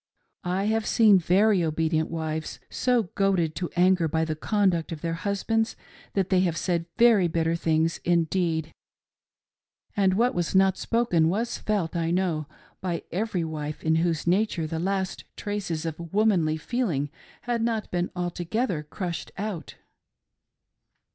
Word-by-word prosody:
I 185 Hz, +2 st, 0 dB
have 220 Hz, +1 st, 0 dB
seen 215 Hz, -5 st, +6 dB
very 190 Hz, +2 st, +3 dB
obedient 160 Hz, 0 st, 0 dB
wives 160 Hz, -1 st, -4 dB
so 250 Hz, -2 st, +2 dB
goaded 190 Hz, -5 st, +1 dB
to 175 Hz, -, -2 dB
anger 180 Hz, -1 st, +4 dB
by 160 Hz, +1 st, 0 dB
the 155 Hz, -1 st, -2 dB
conduct 185 Hz, -1 st, +1 dB
of 160 Hz, -2 st, -6 dB
their 165 Hz, -1 st, -2 dB
husbands 205 Hz, +5 st, -1 dB, 0.4 s
that 195 Hz, -1 st, 0 dB
they 185 Hz, -, +5 dB
have 175 Hz, -3 st, +1 dB
said 170 Hz, -2 st, -1 dB
very 225 Hz, -6 st, +5 dB
bitter 165 Hz, 0 st, 0 dB
things 165 Hz, 0 st, +1 dB
indeed; 165 Hz, -2 st, +1 dB, 1.2 s
and 190 Hz, -2 st, +3 dB
what 240 Hz, +4 st, +2 dB
was 175 Hz, +1 st, -1 dB
not 190 Hz, 0 st, +5 dB
spoken, 185 Hz, -10 st, +1 dB
was 225 Hz, +6 st, -1 dB
felt, 195 Hz, -6 st, -1 dB
I 165 Hz, -1 st, 0 dB
know, 170 Hz, -4 st, 0 dB, 0.3 s
by 175 Hz, -3 st, -2 dB
every 190 Hz, -1 st, -1 dB
wife 155 Hz, -2 st, -5 dB
in 160 Hz, 0 st, +3 dB
whose 165 Hz, -2 st, 0 dB
nature 180 Hz, -2 st, +1 dB
the 160 Hz, +1 st, -3 dB
last 190 Hz, +1 st, -2 dB
traces 190 Hz, -6 st, -3 dB
of 165 Hz, +1 st, -5 dB
womanly 190 Hz, -7 st, +2 dB
feeling.' 160 Hz, -, -1 dB, 0.3 s
had 240 Hz, -1 st, -1 dB
not 225 Hz, -2 st, -1 dB
been 175 Hz, 0 st, 0 dB
altogether 180 Hz, +2 st, -2 dB
crushed 170 Hz, +3 st, -5 dB
out. 200 Hz, -4 st, -5 dB
175 Hz, 145 wpm, -26 LUFS, 165-200 Hz, 1.2 s, seen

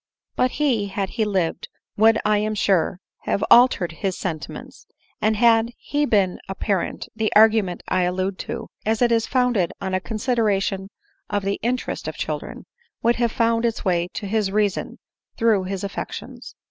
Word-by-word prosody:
But 255 Hz, +2 st, 0 dB
Ae, 250 Hz, -9 st, +2 dB
had 195 Hz, -1 st, -3 dB
he 220 Hz, -, 0 dB
lived, 190 Hz, -5 st, -1 dB, 0.3 s
would 225 Hz, +1 st, +5 dB
I 210 Hz, -1 st, +3 dB
am 215 Hz, +1 st, -1 dB
sure, 190 Hz, -3 st, +1 dB, 0.3 s
have -, -, 0 dB
altered 240 Hz, -8 st, +6 dB
his 185 Hz, +3 st, -3 dB
sentiments; 160 Hz, -5 st, -6 dB, 0.3 s
and 215 Hz, +1 st, +2 dB
had 230 Hz, +1 st, +4 dB
he 295 Hz, 0 st, -1 dB
been 195 Hz, -6 st, +2 dB
a 195 Hz, -, -4 dB
parent, 195 Hz, -2 st, -2 dB
the 220 Hz, -1 st, 0 dB
argument 215 Hz, -4 st, +4 dB
I 185 Hz, -, +1 dB
allude 185 Hz, +2 st, -2 dB
to, -, -, -4 dB, 0.2 s
as 220 Hz, +2 st, +1 dB
it 240 Hz, -, +3 dB
is 230 Hz, -1 st, +2 dB
founded 245 Hz, -9 st, +1 dB
on 190 Hz, -1 st, -4 dB
a 185 Hz, -, +2 dB
consideration 205 Hz, -3 st, -1 dB, 0.4 s
of 205 Hz, -1 st, -1 dB
the 200 Hz, +1 st, -1 dB
interest 250 Hz, +3 st, -2 dB
of -, -, -4 dB
children, -, -, -5 dB, 0.4 s
would 235 Hz, +1 st, +3 dB
have 235 Hz, -1 st, +1 dB
found 230 Hz, 0 st, +1 dB
its 230 Hz, -2 st, -1 dB
way 175 Hz, -2 st, +1 dB
to 205 Hz, -, -4 dB
his 210 Hz, 0 st, 0 dB
reason, 205 Hz, -1 st, -1 dB, 0.4 s
through 220 Hz, -5 st, +2 dB
his 195 Hz, 0 st, -4 dB
affections. 200 Hz, -, -7 dB
210 Hz, 170 wpm, -22 LUFS, 190-230 Hz, 0.4 s, altered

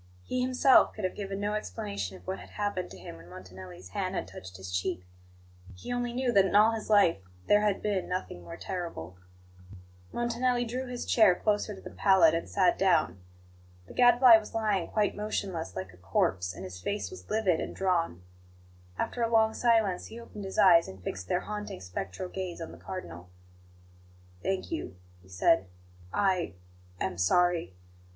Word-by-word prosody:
He 255 Hz, -, -2 dB
himself 255 Hz, +1 st, +5 dB
could 215 Hz, -, -7 dB
have 185 Hz, -, 0 dB
given 195 Hz, -1 st, -5 dB
no 205 Hz, +1 st, -1 dB
explanation 100 Hz, -, -4 dB
of 90 Hz, -, -19 dB
what 95 Hz, +2 st, -4 dB
had -, -, -12 dB
happened 205 Hz, -3 st, -3 dB
to 95 Hz, -, -11 dB
him 85 Hz, -2 st, -10 dB
when 85 Hz, +1 st, -14 dB
Montanelli's 90 Hz, 0 st, -11 dB
hand -, -, -3 dB
had -, -, -3 dB
touched 95 Hz, 0 st, -10 dB
his 95 Hz, -1 st, -8 dB
cheek; 90 Hz, 0 st, -2 dB, 0.7 s
he 90 Hz, -, -6 dB
only 245 Hz, 0 st, -1 dB
knew 250 Hz, 0 st, 0 dB
that 200 Hz, -4 st, +5 dB
in 190 Hz, -, -1 dB
all 215 Hz, +2 st, +7 dB
his 225 Hz, -1 st, -5 dB
life 205 Hz, -6 st, +5 dB, 0.3 s
there 205 Hz, 0 st, +5 dB
had 210 Hz, -2 st, 0 dB
been 205 Hz, -3 st, -1 dB
nothing 180 Hz, -, -4 dB
more 85 Hz, -1 st, -9 dB
terrible. 165 Hz, -, -6 dB, 0.9 s
Montanelli 240 Hz, +1 st, 0 dB
drew 255 Hz, +3 st, -4 dB
his 245 Hz, -1 st, -5 dB
chair 215 Hz, -6 st, +5 dB
closer 210 Hz, +1 st, 0 dB
to -, -, -12 dB
the -, -, -9 dB
pallet 190 Hz, -5 st, +5 dB
and 165 Hz, -, -2 dB
sat 90 Hz, -, +2 dB
down. 90 Hz, +2 st, +2 dB, 0.6 s
The -, -, -13 dB
Gadfly 245 Hz, -1 st, +7 dB
was 220 Hz, 0 st, -8 dB
lying 210 Hz, -5 st, 0 dB
quite 210 Hz, -2 st, 0 dB
motionless, 195 Hz, -, -3 dB
like 95 Hz, -1 st, -6 dB
a -, -, -17 dB
corpse, 90 Hz, 0 st, 0 dB
and -, -, -8 dB
his 90 Hz, -1 st, -8 dB
face 205 Hz, -, -3 dB
was 375 Hz, -, -11 dB
livid 210 Hz, -6 st, +2 dB
and -, -, -5 dB
drawn. 170 Hz, -, 0 dB, 0.7 s
After 245 Hz, -, -2 dB
a 230 Hz, -, +2 dB
long 220 Hz, -1 st, +4 dB
silence, 225 Hz, -7 st, +2 dB
he 230 Hz, -, -9 dB
opened 210 Hz, -3 st, -9 dB
his 190 Hz, -, -6 dB
eyes, 170 Hz, -3 st, +6 dB
and 95 Hz, -1 st, -11 dB
fixed 90 Hz, -1 st, -5 dB
their 180 Hz, -, 0 dB
haunting, 210 Hz, -, -6 dB
spectral 95 Hz, -, -5 dB
gaze 180 Hz, -2 st, -5 dB
on 165 Hz, -, -6 dB
the -, -, -13 dB
Cardinal. 90 Hz, -, -8 dB, 1.1 s
"Thank 190 Hz, -, -2 dB
you," 320 Hz, -, -4 dB, 0.3 s
he 95 Hz, -, -20 dB
said. 95 Hz, +1 st, +3 dB, 0.4 s
"I 185 Hz, -, +1 dB, 0.4 s
am 95 Hz, -2 st, -3 dB
sorry. 170 Hz, -, +2 dB
185 Hz, 180 wpm, -29 LUFS, -, 1.1 s, all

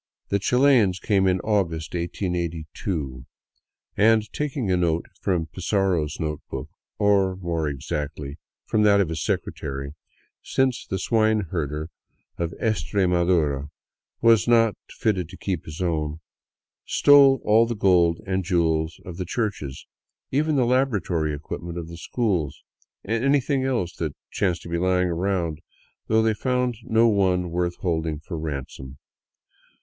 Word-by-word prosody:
The 100 Hz, -, +1 dB
Chilians 120 Hz, -4 st, +3 dB
came 95 Hz, -2 st, +2 dB
in 90 Hz, 0 st, +2 dB
August, 85 Hz, -7 st, -1 dB
1882, 85 Hz, -5 st, -3 dB, 0.7 s
and, 110 Hz, 0 st, +3 dB
taking 135 Hz, -8 st, -2 dB
a -, -, +4 dB
note 85 Hz, -2 st, +1 dB, 0.2 s
from 90 Hz, -4 st, 0 dB
Pizarro's 90 Hz, -2 st, -1 dB
note 75 Hz, -2 st, -3 dB
book 65 Hz, +3 st, -5 dB, 0.2 s
— -, -, -67 dB
or, 100 Hz, -3 st, +3 dB
more 85 Hz, -4 st, -2 dB
exactly, 70 Hz, +1 st, -5 dB, 0.3 s
from 110 Hz, -, +1 dB
that 100 Hz, -1 st, +5 dB
of 95 Hz, -5 st, +2 dB
his 80 Hz, -2 st, -3 dB
secretary, 70 Hz, -1 st, -3 dB, 0.5 s
since 130 Hz, -2 st, 0 dB
the 95 Hz, -, -2 dB
swine 110 Hz, +2 st, +2 dB
herder 75 Hz, -2 st, -3 dB, 0.5 s
of 85 Hz, -1 st, -1 dB
Estre 105 Hz, -3 st, 0 dB
madura 85 Hz, -6 st, +1 dB, 0.6 s
was 115 Hz, -1 st, +5 dB
not 115 Hz, -2 st, +5 dB, 0.2 s
fitted 95 Hz, -7 st, -1 dB
to 95 Hz, -, -11 dB
keep 95 Hz, -5 st, -3 dB
his 80 Hz, +4 st, -5 dB
own 80 Hz, -3 st, -1 dB, 0.4 s
— -, -, -70 dB
stole 140 Hz, -2 st, +6 dB
all 110 Hz, +2 st, +5 dB
the 120 Hz, -, -2 dB
gold 90 Hz, -5 st, +3 dB
and 95 Hz, -1 st, -1 dB
jewels 80 Hz, -3 st, 0 dB
of 90 Hz, -2 st, -8 dB
the 90 Hz, -, -3 dB
churches, 80 Hz, -, -3 dB, 0.5 s
even 150 Hz, +3 st, +1 dB
the 130 Hz, -3 st, +3 dB
laboratory 100 Hz, -, +1 dB
equipment 85 Hz, +3 st, -6 dB
of 85 Hz, -2 st, -5 dB
the 85 Hz, -, -8 dB
schools, 90 Hz, -, -2 dB, 0.4 s
and 115 Hz, +3 st, -1 dB
anything 140 Hz, -1 st, +2 dB
else 115 Hz, -10 st, -1 dB
that 80 Hz, -4 st, -3 dB, 0.2 s
chanced 90 Hz, -3 st, 0 dB
to -, -, -9 dB
be 85 Hz, 0 st, -1 dB
lying 90 Hz, 0 st, +2 dB
around; 85 Hz, -2 st, -1 dB, 0.5 s
though 110 Hz, 0 st, +3 dB
they 110 Hz, -1 st, +3 dB
found 125 Hz, +1 st, 0 dB
no 115 Hz, +1 st, +4 dB
one 90 Hz, -5 st, +2 dB
worth 85 Hz, 0 st, -1 dB
holding 80 Hz, -4 st, -1 dB
for 80 Hz, +1 st, -6 dB
ransom. 70 Hz, -3 st, -6 dB
90 Hz, 145 wpm, -24 LUFS, 80-110 Hz, 0.7 s, stole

